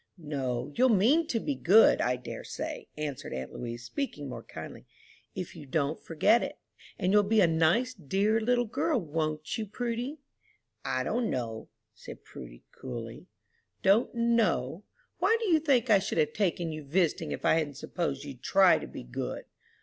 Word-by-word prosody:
"No, 135 -5 -3
you'll 255 - +4
mean 250 - +4
to 230 - 0
be 290 - -2
good, 215 -2 +5
I 125 +1 +1
dare 125 - -7
say," - - -6
answered 145 -2 -4
aunt 65 0 -6
Louise, 120 -1 -6
speaking 145 - -4
more - - -6
kindly, - - -10 0.5
"if 180 - -5
you 150 -4 -10
don't 145 +3 -1
forget 205 +8 +3
it. - - -4 0.4
And 185 +2 +1
you'll 210 - +7
be 215 +2 +2
a 195 - +7
nice, 165 +10 +2
dear 200 - 0
little 245 +2 +2
girl, 250 +5 0
won't 155 0 -3
you, 215 - -3
Prudy?" 245 +6 -3 0.7
"I 130 - -1
don't 235 - -1
know," 115 -3 -4 0.2
said - - -11
Prudy, - - -11
coolly. 115 -3 -8 0.6
"Don't 205 +6 +3
know? 215 - +1 0.3
Why, 410 +6 +3
do 460 - -2
you 325 -2 +5
think 260 -6 +2
I 200 - +7
should 190 - -3
have 155 -2 +2
taken 175 -4 0
you 155 -1 -6
visiting 165 +4 0
if - - -4
I - - +5
hadn't 145 -3 -3
supposed 140 -5 -3
you'd 135 -4 -9
try 190 +4 +5
to - - -7
be - - -8
good?" - - -5
175 Hz, 175 wpm, -29 LUFS, 140-230 Hz, 0.7 s, you'll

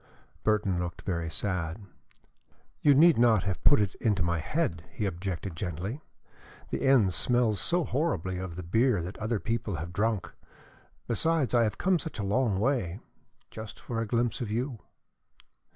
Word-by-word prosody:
Burton 100 -4 +1
looked 90 -1 -5
very 85 -3 -2
sad. 90 -1 -2 1.0
"You 145 -2 +6
need 160 -2 +6
not 115 -5 +5
have 95 -2 -3
put 145 - +6
it 100 -2 0
into 105 -6 +2
my 85 0 0
head," 105 - -1
he 105 - -3
objected 95 -1 -4
gently. 95 - -4 0.7
"The - - -2
inn 130 -8 +4
smells 120 0 +2
so 175 0 +2
horribly 115 - -1
of 90 -3 -5
the 90 - -6
beer 110 +2 +2
that 90 +4 -7
other 110 0 -1
people 115 -3 -2
have 85 +2 -5
drunk. 105 +1 -1 0.7
Besides, 160 +3 +1
I 120 -1 +5
have 105 - -2
come 185 -2 +2
such 160 - -6
a 105 - -2
long 105 0 +1
way 110 -7 0 0.5
just 110 -2 -8
for 115 -2 -3
a 115 - -2
glimpse 120 +2 0
of 115 - -3
you." 120 +2 -2
105 Hz, 165 wpm, -29 LUFS, 90-120 Hz, 1.0 s, You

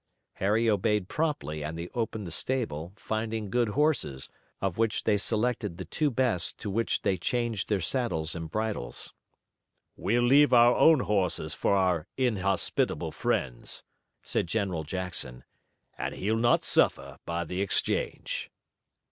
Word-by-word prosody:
Harry 110 +4 +2
obeyed 105 -2 +2
promptly, 80 - -2
and 80 +2 -4
they 85 +1 -4
opened 110 -3 -3
the 85 - -6
stable, 85 - -2
finding 110 -1 -3
good 120 -2 +2
horses, 130 - 0 0.3
of 95 0 -2
which 115 -1 +1
they 105 - +3
selected 110 -3 0
the 95 - -6
two 150 - 0
best 115 - 0
to 105 - -5
which 115 +3 0
they 95 - +2
changed 120 0 -1
their 105 -2 +2
saddles 85 -5 -1
and 80 -1 -5
bridles. 105 - -3 0.8
"We'll 115 +6 +1
leave 140 +3 +6
our 120 0 +7
own 160 -4 +6
horses 90 -8 0
for 100 - +1
our 90 -5 +1
inhospitable 105 -7 +1
friends," 60 -3 -2 0.4
said - - -1
General 95 -4 -1
Jackson, 80 -7 -3 0.6
"and - - -3
he'll 110 +3 0
not 120 +1 +3
suffer - - +2
by 85 0 -2
the 90 +3 -3
exchange." 100 - -1
105 Hz, 140 wpm, -28 LUFS, 85-120 Hz, 0.8 s, our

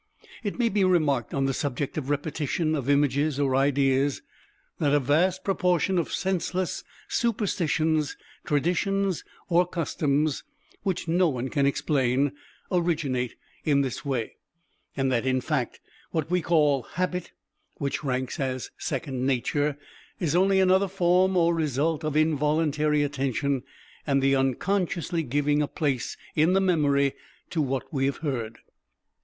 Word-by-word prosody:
It 205 - -3
may 240 -2 +2
be 205 -1 +1
remarked 155 - +2
on 135 0 0
the 135 - +1
subject 140 +1 -2
of 145 -3 -3
repetition 150 +2 -1
of 140 -3 -2
images 145 0 +2
or 135 -2 +2
ideas, 135 0 +2 0.6
that 145 -2 +3
a - - +5
vast 165 +8 +2
proportion 185 -2 +1
of 165 - -2
senseless 185 -1 -1 0.2
superstitions, 160 - 0 0.3
traditions 180 +5 0 0.2
or 175 0 +3
customs, 150 -3 0 0.4
which 185 -4 -2
no 175 +1 +3
one 130 -2 -3
can 140 0 +2
explain, 135 -1 +1 0.4
originate 150 -9 0 0.3
in 140 -2 +3
this 130 -3 -3
way, 130 -6 -3 0.6
and 135 -1 +1
that 120 -2 +1
in 130 0 +2
fact - - -2 0.3
what 160 0 -2
we 180 0 +2
call 150 -5 +3
habit 180 0 -2 0.4
(which 140 0 -3
ranks 130 -1 -2
as 130 -2 -3
second 135 -4 -2
nature) 145 +3 0 0.4
is 165 -3 0
only 190 +2 +4
another 190 +1 +4
form 185 0 +2
or 170 0 +4
result 155 0 0
of 155 -1 -1
involuntary 150 -1 +2
attention 140 -1 -1 0.5
and 140 -1 +3
the 135 0 +4
unconsciously 170 +5 0
giving 145 +1 +1
a 150 - 0
place 140 -6 -2 0.2
in 160 +4 +4
the 195 - +4
memory 145 -7 +2 0.4
to 165 - 0
what 135 0 -2
we 135 -1 +1
have 140 - -2
heard. 115 -5 -3
150 Hz, 140 wpm, -26 LUFS, 135-175 Hz, 0.6 s, a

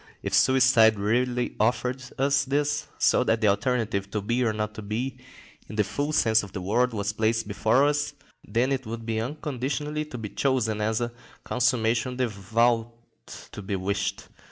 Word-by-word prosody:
If - - -3
suicide 125 -4 +5
really 120 +4 0
offered 125 +3 0
us 140 +1 +2
this, 145 +2 0
so - - +3
that 115 -2 +2
the 110 - +3
alternative 105 -2 0
"to 105 - -2
be 120 +4 0
or 115 - +2
not 105 0 -3
to 110 - -7
be," 120 +6 -3 0.5
in 105 - -7
the 105 - +3
full 145 +9 -2
sense 110 -7 +3
of 100 -2 -10
the 100 - -4
word, 120 +7 +1
was 100 -2 -2
placed 110 0 0
before 110 +6 +2
us, 145 0 0 0.3
then 120 +6 0
it 135 -3 -2
would 115 0 -6
be 110 -1 -1
unconditionally 150 +2 -3
to 130 - -8
be 110 -3 -5
chosen 110 -6 0
as 110 +2 0
"a 120 0 -2 0.3
consummation 120 0 +1
devoutly 115 0 +1 0.6
to - - -8
be 100 0 -3
wished." 95 +2 -2
115 Hz, 175 wpm, -26 LUFS, 110-130 Hz, 0.6 s, suicide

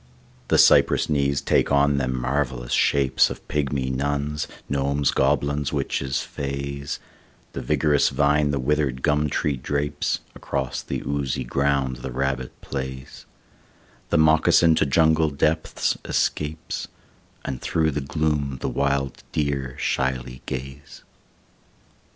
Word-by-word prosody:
The - - +3
cypress - - +5
knees 70 -1 +1
take - - +2
on 70 0 +3
them 65 -2 -1
marvellous 65 -1 -2
shapes 70 -2 +3
Of - - -9
pygmy 70 -3 -1
nuns, 70 +2 -1 0.2
gnomes, 70 0 +1
goblins, 70 +1 +1
witches, 70 -2 -1
fays, 70 0 -4 0.6
The - - -4
vigorous 75 -1 +2
vine 75 0 +2
the 70 - 0
withered 70 -1 0
gum 75 -1 +2
tree 70 0 -1
drapes, 70 +3 -2
Across 65 -3 -3
the - - -4
oozy 70 -3 -1
ground 70 0 0
the 65 - -6
rabbit 65 0 -2
plays, 65 -1 -6 0.8
The - - +2
moccasin 80 +1 +5
to 75 - +2
jungle 80 +2 +3
depths 75 +2 0
escapes, 80 +2 -2 0.6
And 65 -2 -4
through 80 -1 +1
the 75 0 -2
gloom 75 -1 -1
the - - -2
wild 70 -1 -1
deer 70 -3 -1
shyly 65 -1 -2
gaze. 70 +2 -7
70 Hz, 120 wpm, -24 LUFS, 65-75 Hz, 0.8 s, cypress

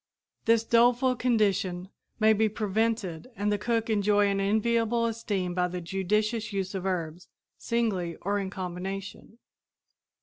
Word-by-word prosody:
This 230 0 +4
doleful 245 +3 +3
condition 200 -7 0 0.3
may 220 0 +5
be 220 +1 +2
prevented 215 -4 -1
and 205 0 0
the 205 - 0
cook 230 0 0
enjoy 205 -1 +3
an 195 0 0
enviable 230 +3 +1
esteem 205 -6 -2
by 180 0 +1
the 180 0 -5
judicious 210 +5 -1
use 195 -1 -3
of 190 -1 -3
herbs, 175 -2 -3 0.3
singly 200 -8 -1
or 205 +2 0
in 195 -1 -3
combination. 190 +3 -6
205 Hz, 135 wpm, -28 LUFS, 190-225 Hz, 0.3 s, may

